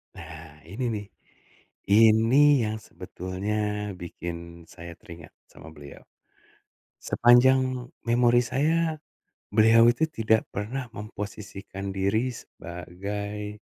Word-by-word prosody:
Nah, 80 -1 -12
ini 100 +10 -5
nih, 105 -1 -5 0.8
ini 115 +6 +5
yang 110 0 -2
sebetulnya 105 +3 -4
bikin 85 -1 -8
saya 85 0 -10
teringat 85 -2 -13 0.2
sama - - -13
beliau. 70 -1 -12 1.0
Sepanjang 125 +1 +3 0.2
memori 120 0 +4
saya, 160 +4 0 0.5
beliau 115 +2 +5
itu 145 +7 +2
tidak 110 -5 +1
pernah 120 +7 -4
memposisikan 100 -2 -7
diri 110 +6 0
sebagai, 100 +5 -7
105 Hz, 90 wpm, -26 LUFS, 95-120 Hz, 1.0 s, ini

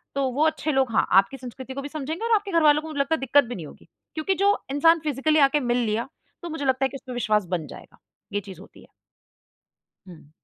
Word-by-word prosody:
तो 275 -1 0
वो 290 +5 +1
अच्छे 310 -1 0
लोग, 265 -3 +1
हाँ, 225 - +2
आपकी 195 +8 +4
संस्कृति 260 +1 -9
को 275 - -5
भी 285 - -6
समझेंगे 310 +7 -4
और 465 - +2
आपके 405 -1 -2
घरवालों 305 -3 +4
को 320 - -9
मुझे 300 -3 -5
लगता 280 +4 +1
है - - -6
दिक्कत 270 +2 +4
भी 245 -1 -7
नहीं 170 - -7
होगी। - - -15 0.3
क्योंकि 315 +5 0
जो 405 +1 +3
इंसान 330 +4 +4
फ़िज़िकली 305 +1 +1
आके 280 +1 +4
मिल 245 -2 0
लिया, 225 +4 -1 0.4
तो 345 - -5
मुझे 315 -3 -4
लगता 265 0 +2
है - - 0
कि 275 - -11
उस - - -20
पे 250 - -5
विश्वास 215 -4 +1
बन 160 -3 -5
जाएगा, - - -13 0.4
ये 205 - +1
चीज़ 190 -2 -11
होती - - -16
है। - - -19 1.2
हुँ। 165 -5 -14
275 Hz, 245 wpm, -24 LUFS, 245-310 Hz, 1.2 s, आपकी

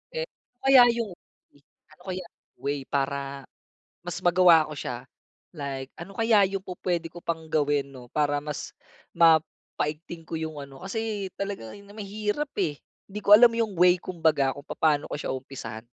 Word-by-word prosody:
Eh, - - -1
ano 375 - -17
kaya 270 -2 +8
yung 230 -4 -2 0.8
ano 155 +3 -19
kaya 185 -1 -4 0.3
way 140 -1 -3
para 140 0 -2 0.6
mas 175 0 -5
magawa 175 -2 +6
ako 150 - -8
siya? 125 - -4 0.6
Like, 135 -2 -5
ano 175 +4 -8
kaya 225 -3 +5
yung 195 -1 -4
pu-puwede 175 -2 -2
ko 175 +1 -12
pang 165 -1 -3
gawin 145 -3 +1
'no, 125 -2 -12
para 145 -1 +1
mas 150 -2 -5 0.4
mapaigting 160 0 +1
ko 165 - -10
yung 160 -1 -5
ano? 140 -1 -10
Kasi 205 0 -3
talaga 200 - -4
na 200 0 -15
mahirap, 210 +7 -3
eh, 160 -7 +1 0.3
hindi 210 +1 -6
ko 205 0 +9
alam 240 0 +7
yung 225 -5 -1
way 180 +1 +6
'kumbaga 160 -6 +1
kung 140 - -10
papaano 150 -3 +1
ko - - -3
siya - - -3
umpisahan. 125 -4 -7
165 Hz, 160 wpm, -26 LUFS, 145-200 Hz, 0.8 s, ko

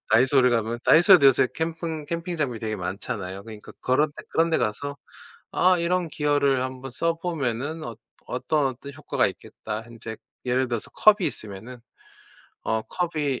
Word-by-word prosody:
다이소를 130 +2 +5
가면 115 0 0
다이소에도 170 -2 +7
요새 130 -1 +5
캠픙 160 -1 -3
캠핑 170 +1 -3
장비 130 -7 -1
되게 110 -1 -2
많잖아요. 95 +1 -5
그러니까 110 -2 -11
그런 145 +4 +2
데 - - -11
그런 165 +1 +2
데 - - +2
가서 140 +7 -2 0.6
'아 185 0 +4
이런 175 0 0
기어를 145 -3 +1
1 130 0 -5
번 135 - -6
써보면은 160 -2 -2
어 115 -2 -6 0.3
어떤, 135 +3 0
어떤 135 +2 -8
효과가 - - 0
있겠다.' 110 +1 -7
인제 115 -1 -8 0.3
예를 130 +1 +1
들어서 120 -3 -4
컵이 205 -4 +5
있으면은 110 +4 -9 0.8
어 110 0 0
컵이 155 -4 -2
135 Hz, 335 characters per minute, -25 LUFS, 115-160 Hz, 0.8 s, 다이소에도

